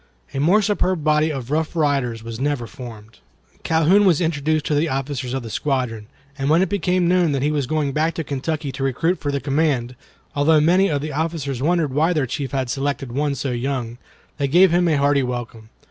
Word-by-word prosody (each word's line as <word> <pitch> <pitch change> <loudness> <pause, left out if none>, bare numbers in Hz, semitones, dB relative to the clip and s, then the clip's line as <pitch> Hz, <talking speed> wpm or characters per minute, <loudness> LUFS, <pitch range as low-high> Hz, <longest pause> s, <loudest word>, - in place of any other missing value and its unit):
A 135 - -2
more 185 +9 +4
superb 185 -5 0
body 155 +1 +3
of 135 -3 -6
rough 160 +2 -1
riders 135 -7 0
was 115 0 -7
never 140 -3 -1
formed. 115 -5 -11 0.4
Calhoun 165 +6 +3
was 180 -6 +4
introduced 155 -2 0
to - - 0
the 150 +3 +1
officers 135 -1 -3
of 135 - -3
the 115 - -7
squadron, 125 -7 -2 0.3
and 135 +1 0
when 165 +4 +4
it 190 - -2
became 180 -2 +1
known 175 -3 +3
that 135 -1 -1
he 150 - +1
was 145 -4 -1
going 150 -1 0
back 155 +4 0
to 165 - -3
Kentucky 145 +1 -3
to 135 - -5
recruit 165 +7 0
for 145 - -2
the 140 - -1
command—although 145 +1 0
many 180 +6 +3
of 145 -3 -1
the 155 -1 -4
officers 150 -4 -2
wondered 160 -2 +1
why 160 +5 +2
their 150 -5 +1
chief 130 +2 -4
had 135 -2 -1
selected 135 +1 -3
one 145 +2 -1
so 135 0 -3
young—they 125 +2 -5
gave 180 +5 +5
him 175 +1 +3
a 155 -3 +2
hearty 140 0 +3
welcome. 120 -3 -5
145 Hz, 205 wpm, -21 LUFS, 130-160 Hz, 0.4 s, gave